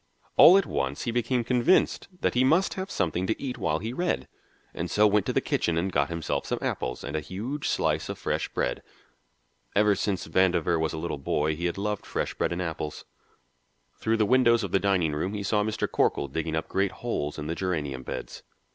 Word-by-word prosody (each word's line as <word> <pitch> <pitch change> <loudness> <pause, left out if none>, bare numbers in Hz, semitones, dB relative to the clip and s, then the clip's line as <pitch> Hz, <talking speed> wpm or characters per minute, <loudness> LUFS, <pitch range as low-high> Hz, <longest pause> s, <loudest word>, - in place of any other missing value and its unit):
All 185 - +9
at 195 - +2
once 65 +1 -2
he 120 - -1
became 120 +1 0
convinced 125 +9 +2
that - - +1
he 125 - +3
must 165 +9 +3
have 190 +1 -5
something 90 - -1
to 110 - -1
eat 125 -2 -4
while 85 -6 +1
he 110 +7 -5
read, 175 +6 -1 0.5
and 85 +1 -4
so 105 +5 +4
went 105 -1 +3
to - - +1
the - - +1
kitchen 85 -1 0
and 95 +3 0
got 70 -3 +1
himself 85 -1 -2
some - - -1
apples 60 - -3
and 70 - -5
a - - +1
huge 110 - -4
slice - - 0
of - - -4
fresh - - -2
bread. - - -2 0.9
Ever 105 0 +5
since 100 -1 -1
Vandover 85 -1 +2
was 80 -1 -1
a - - -4
little 80 -2 -3
boy 75 +3 0
he 85 +3 -4
had 85 - -3
loved 105 0 -3
fresh - - -2
bread - - -1
and 90 +2 -2
apples. 80 -3 -5 0.9
Through 110 0 +1
the 110 - +3
windows 120 -1 +4
of 100 - -4
the 95 - +3
dining 95 -6 +1
room 90 +7 -2
he 100 - -3
saw 105 +1 +1
Mr. 110 0 -1
Corkle - - +1
digging 80 +2 -2
up 80 - -2
great 95 0 0
holes 75 -11 -3
in 75 - -5
the 80 - -2
geranium 75 -8 -2
beds. - - -6
95 Hz, 215 wpm, -27 LUFS, 80-115 Hz, 0.9 s, All